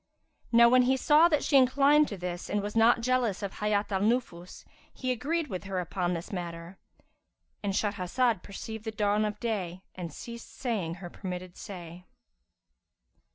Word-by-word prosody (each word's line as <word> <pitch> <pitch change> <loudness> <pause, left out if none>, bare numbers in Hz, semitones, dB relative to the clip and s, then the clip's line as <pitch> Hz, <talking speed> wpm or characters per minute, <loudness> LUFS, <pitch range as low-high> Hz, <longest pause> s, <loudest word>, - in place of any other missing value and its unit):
"[FN#355] - - -29
Now 235 0 +8
when 255 +1 +6
he 260 +1 +3
saw 300 +5 +5
that 300 -4 +1
she 280 - +4
inclined 280 +3 +5
to 200 - -6
this 180 0 -5
and 205 -1 0
was 210 +1 -5
not 230 +1 +5
jealous 235 -5 0
of 200 - -5
Hayat 210 0 0
al 190 -1 0
Nufus, 205 -6 -2 0.3
he 255 -1 -3
agreed 305 +7 -1
with 195 -8 -6
her 195 -2 -2
upon 180 0 -1
this 170 +6 -6
matter.—And 175 +2 -8
Shahrazad 205 +2 0
perceived 220 +2 -7
the 225 - -3
dawn 210 0 +1
of 210 0 -4
day 190 -6 -3
and 175 -3 -6
ceased 235 +9 -10
saying 205 -10 -2
her 175 -2 -9
permitted 180 -2 -6
say. 180 -2 -9
205 Hz, 165 wpm, -29 LUFS, 180-240 Hz, 0.3 s, Now